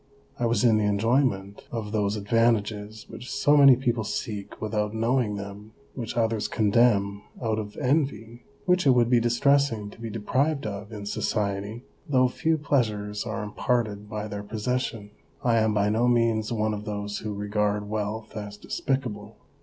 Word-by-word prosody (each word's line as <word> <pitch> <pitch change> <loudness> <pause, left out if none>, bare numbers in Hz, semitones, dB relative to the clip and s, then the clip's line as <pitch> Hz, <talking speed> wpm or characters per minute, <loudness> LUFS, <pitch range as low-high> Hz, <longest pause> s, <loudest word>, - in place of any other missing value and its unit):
I 120 - +2
was 115 -1 +1
in 115 -3 +5
the 105 - +1
enjoyment 105 -1 +1
of 110 -3 -4
those 105 -1 0
advantages 110 0 0
which 125 - -9
so 145 - +3
many 140 -3 +8
people 120 -3 0
seek 105 -1 -5
without 105 0 -2
knowing 115 -1 +1
them, 100 +2 -8 0.2
which 120 -2 -5
others 115 -2 +1
condemn 100 -2 +2 0.2
out 110 -2 -1
of 105 -1 -7
envy, 130 -5 -1 0.2
which 180 -4 +3
it 130 - +6
would 120 0 +3
be 120 - +6
distressing 120 -2 +2
to 115 - -15
be 115 - -4
deprived 135 +7 0
of 105 +1 -5
in 105 -2 -7
society, 105 +2 -2 0.3
though 130 -2 +4
few 160 +5 0
pleasures 110 -8 -1
are 110 0 -3
imparted 105 -1 -1
by 105 -1 -4
their 105 -1 -5
possession. 110 0 -3 0.3
I 120 -2 +3
am 110 0 +2
by 105 0 +2
no 115 +3 +2
means 115 -2 +2
one 110 -1 0
of 105 0 -5
those 105 -1 -4
who 105 -2 -4
regard 105 0 -1
wealth 110 +1 -4
as 105 -1 -6
despicable. 110 -6 -3
110 Hz, 165 wpm, -26 LUFS, 105-120 Hz, 0.3 s, many